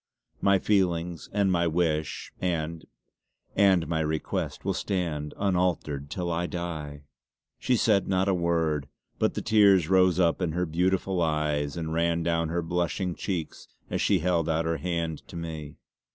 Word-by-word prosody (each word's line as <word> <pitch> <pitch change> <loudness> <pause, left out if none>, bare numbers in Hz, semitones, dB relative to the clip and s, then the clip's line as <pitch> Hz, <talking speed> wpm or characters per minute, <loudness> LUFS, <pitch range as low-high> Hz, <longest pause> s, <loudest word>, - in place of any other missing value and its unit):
My 100 0 +4
feelings 90 -4 0
and 100 -1 +2
my 85 -1 +2
wish, 80 -2 -1
and 85 -2 -2 0.7
and 95 -4 +4
my 80 -1 -1
request 80 0 -2
will - - +1
stand 80 -6 -2
unaltered 90 -7 0
till 90 0 -3
I 85 +1 -1
die!" 80 -5 -5 0.6
She 125 -1 +2
said 105 -3 +3
not 95 0 +1
a 100 - +3
word, 80 -5 0 0.3
but - - +1
the - - -3
tears 100 -6 +5
rose 95 -1 +4
up 85 0 +2
in 85 -3 0
her 90 +1 0
beautiful 90 +2 0
eyes 75 -2 0
and 80 -1 -3
ran 85 0 +1
down 85 -1 0
her 85 +1 -1
blushing 90 +2 -1
cheeks 85 -4 -4 0.2
as - - 0
she 100 - +3
held 85 -1 +1
out 80 +1 +1
her 80 0 0
hand 85 -3 -2
to - - -11
me. 80 -3 -6
85 Hz, 160 wpm, -27 LUFS, 80-90 Hz, 0.7 s, tears